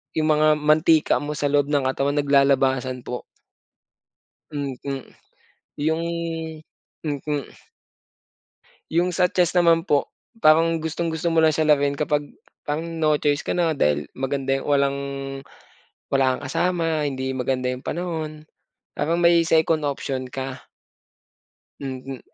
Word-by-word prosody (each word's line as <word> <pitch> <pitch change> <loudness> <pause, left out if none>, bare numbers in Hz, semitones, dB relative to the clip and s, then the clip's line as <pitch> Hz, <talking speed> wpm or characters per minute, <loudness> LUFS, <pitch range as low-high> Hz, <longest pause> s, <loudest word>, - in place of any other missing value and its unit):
yung 155 -1 +1
mga 155 0 +4
mantika 155 +1 +3
mo 145 +1 -3
sa 145 -1 0
loob 145 -1 +3
ng 145 -3 +1
katawan 140 +2 -1
nag-lalabasan 135 -2 +2
po. 125 - -5 1.3
Mm 140 -3 -3 1.1
yung 160 +1 +1 1.0
mm. 145 -1 -2 1.5
Yung 175 +2 +2
sa 180 +1 +3
chest 180 0 +1
naman 165 -1 +4
po, 145 -5 0 0.3
parang 165 -2 +4
gustong-gusto 160 +1 -3
mo 160 - +4
lang 160 - +5
siya 155 0 0
laruin 145 -1 +3
kapag 150 -1 -1 0.3
parang 155 +3 -3 0.2
no 155 -1 +3
choice 145 0 +1
ka - - -5
na 170 -3 +1
dahil 75 - +1
maganda 135 0 -1
yung - - -9
walang 140 -1 +2 1.1
wala 135 -1 +3
kang - - -9
kasama 165 -4 0
hindi 130 -1 -3
maganda 130 0 -1
yung 125 0 -5
panahon, 160 -3 -4 0.5
parang 165 +2 0
may 170 -1 +5
second 160 -1 +2
option 135 -3 -3
ka. 135 -1 -6 1.2
Mm, 130 -1 -6
145 Hz, 125 wpm, -23 LUFS, 135-160 Hz, 1.5 s, lang